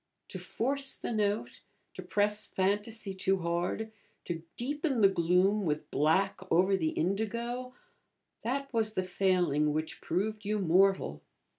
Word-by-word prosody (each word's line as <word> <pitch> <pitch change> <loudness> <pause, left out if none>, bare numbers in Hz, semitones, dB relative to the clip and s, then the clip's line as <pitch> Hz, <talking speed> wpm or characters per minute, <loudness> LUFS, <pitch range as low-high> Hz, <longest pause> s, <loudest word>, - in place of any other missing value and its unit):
To - - -6
force 275 +3 -1
the - - -4
note, 210 -1 -1 0.3
to - - -7
press 210 +1 0
fantasy 205 +2 -1
too 190 0 +1
hard, 175 +6 -2 0.3
to 165 -2 -4 0.2
deepen 280 0 -1
the 200 - +8
gloom 190 +3 +2
with 150 -3 -2
black 160 +7 +2
over 190 +4 +4
the 160 -4 0
indigo, 235 +8 -2 0.7
that 275 +4 -3
was 220 -2 +1
the 185 - +1
failing 175 -6 +1
which 155 +1 -3
proved 210 +4 -2
you 210 +1 0
mortal. 185 - +2
195 Hz, 135 wpm, -31 LUFS, 175-220 Hz, 0.7 s, the